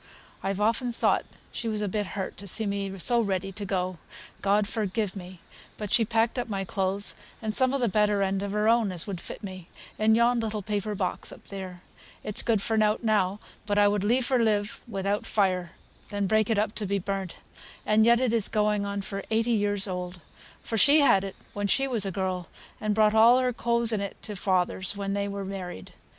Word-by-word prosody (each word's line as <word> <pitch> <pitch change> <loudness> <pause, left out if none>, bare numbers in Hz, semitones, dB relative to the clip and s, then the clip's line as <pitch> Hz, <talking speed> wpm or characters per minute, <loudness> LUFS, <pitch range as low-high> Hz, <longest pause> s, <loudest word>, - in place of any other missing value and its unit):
I've 195 0 -2
often 230 +4 +1
thought 230 - +1 0.3
she 235 - -4
was 215 -1 -1
a - - 0
bit 205 +1 -2
hurt 190 - -3
to 200 - -8
see 220 +4 -1
me 200 -1 -3
so 235 +6 +5
ready 195 -2 -2
to 205 +1 -6
go 185 -3 -2 0.4
God 205 +1 +2
forgive 210 -2 -2
me! 180 -2 -9 0.4
But 210 -2 -5
she 235 -2 +4
packed 225 +2 +1
up 240 - -3
my 195 -2 -2
clothes, 195 +2 +1 0.2
and 215 -1 -3
some 260 +3 +2
o' 275 - +1
the 245 -3 +1
better 210 -1 +2
end 195 0 0
of 200 0 -3
her 210 +1 +1
own 225 -3 +3
as 175 -3 -2
would 190 -4 -5
fit - - -9
me, 185 -3 -8 0.3
in 220 +1 +4
yon 235 +1 +3
little 215 -2 -3
paper 210 0 -2
box 185 -2 -2
up - - -13
there 185 -3 -7 0.4
it's 210 - 0
good 220 -4 +1
for 225 - 0
nought 215 +1 +2
now, 205 -3 +1 0.3
but 205 -1 0
I 205 0 +6
would 205 -1 +1
liefer 250 +3 +2
live 210 -2 0
without 200 -1 -1
fire 185 -4 0 0.4
than 205 0 -1
break 215 +2 +2
it 225 - +2
up 210 +1 0
to 210 - -2
be 200 +1 0
burnt; 195 -1 -4 0.5
and 215 +1 +4
yet 235 +1 +5
it's 230 -4 +1
going 210 -1 +1
on 200 0 -3
for 195 0 -4
eighty 225 +2 +1
years 205 -2 +1
old, 180 -1 -5 0.4
for 225 - -2
she 290 +7 +6
had 195 -9 +5
it 195 - -6 0.2
when 205 0 -1
she 270 +6 +2
was 225 -7 0
a - - -2
girl, 185 -2 -2 0.3
and 215 -1 -1
brought 215 -1 +4
all 230 +3 +7
her 255 -1 +1
clothes 235 0 +1
in 215 -3 0
it 200 - -5
to 210 - -4
father's, 190 +1 0
when 195 -1 -2
they 200 0 -1
were 200 -1 -4
married. 185 - -7
205 Hz, 215 wpm, -27 LUFS, 195-220 Hz, 0.5 s, all